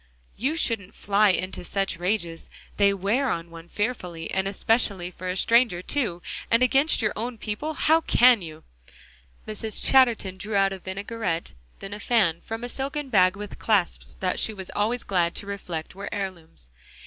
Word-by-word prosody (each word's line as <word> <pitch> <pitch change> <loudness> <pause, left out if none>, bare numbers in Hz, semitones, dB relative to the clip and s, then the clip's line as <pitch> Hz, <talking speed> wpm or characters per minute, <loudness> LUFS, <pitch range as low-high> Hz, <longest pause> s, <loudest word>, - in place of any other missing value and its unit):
You 275 +9 -1
shouldn't 220 - -1
fly 205 +1 +3
into 185 0 -1
such 195 0 -1
rages; 175 -3 -2 0.3
they 200 -1 +5
wear 205 +8 0
on 165 0 -3
one 165 0 -11
fearfully; 180 -7 -3
and 190 0 0
especially 200 -3 +1
for 185 +1 -8
a 180 - -1
stranger 230 -3 +3
too, 205 -12 -1 0.3
and 230 +2 +4
against 270 +1 +4
your 210 - +1
own 235 +2 -4
people 220 +10 -4
how 320 +4 +4
can 245 -7 +5
you?" 160 -2 -9 0.8
Mrs. 215 0 -3
Chatterton 235 -8 +4
drew 210 +2 -4
out 195 0 +3
a 190 - -7
vinaigrette, 190 - -4 0.3
then 195 +1 -7
a 205 - -6
fan 195 -9 +2
from 225 +1 -5
a - - -3
silken 275 +2 -3
bag, 185 -4 +4
with 205 0 -8
clasps 205 -6 0
that 185 -1 0
she 220 - +1
was 190 -2 -7
always 225 +4 0
glad 175 -3 0
to - - -3
reflect 180 -5 -6
were 200 +2 -6
heirlooms. 170 - -6
200 Hz, 170 wpm, -25 LUFS, 180-230 Hz, 0.8 s, they